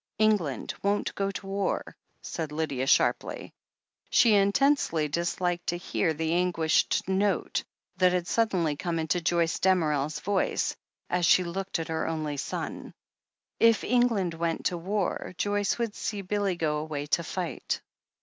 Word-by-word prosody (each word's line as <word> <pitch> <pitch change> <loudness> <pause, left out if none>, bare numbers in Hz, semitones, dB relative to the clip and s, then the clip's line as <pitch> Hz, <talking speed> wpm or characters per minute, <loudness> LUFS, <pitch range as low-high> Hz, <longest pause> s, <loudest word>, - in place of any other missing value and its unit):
"England 205 - +1
won't 200 +1 0
go 195 0 -1
to 195 0 -6
war," 195 0 -2 0.3
said 160 -3 -4
Lydia 145 -4 -2
sharply. - - +1 0.6
She 230 -3 +5
intensely 200 - +3
disliked 175 +3 -1
to 175 - 0
hear 175 -1 0
the 160 +1 -1
anguished 175 -3 +2
note 190 0 0 0.3
that 185 0 +4
had 180 -1 0
suddenly 180 -8 +1
come 170 +1 -2
into 160 +2 0
Joyce 170 0 +1
Damerel's 155 -6 +1
voice, 200 -1 0 0.3
as 180 -1 +1
she 185 - +6
looked 190 +3 -3
at 165 -1 -5
her 160 0 -1
only 155 -3 -2
son. - - -5 0.6
If 230 -1 +5
England 230 -8 +2
went 165 0 -2
to 175 - +1
war, 190 0 -2
Joyce 205 0 0
would 230 -3 -2
see 205 -2 -4
Billy 200 -1 0
go 155 -3 0
away 150 -2 -4
to 170 +3 +1
fight. 175 +1 -3
175 Hz, 145 wpm, -28 LUFS, 160-200 Hz, 0.6 s, she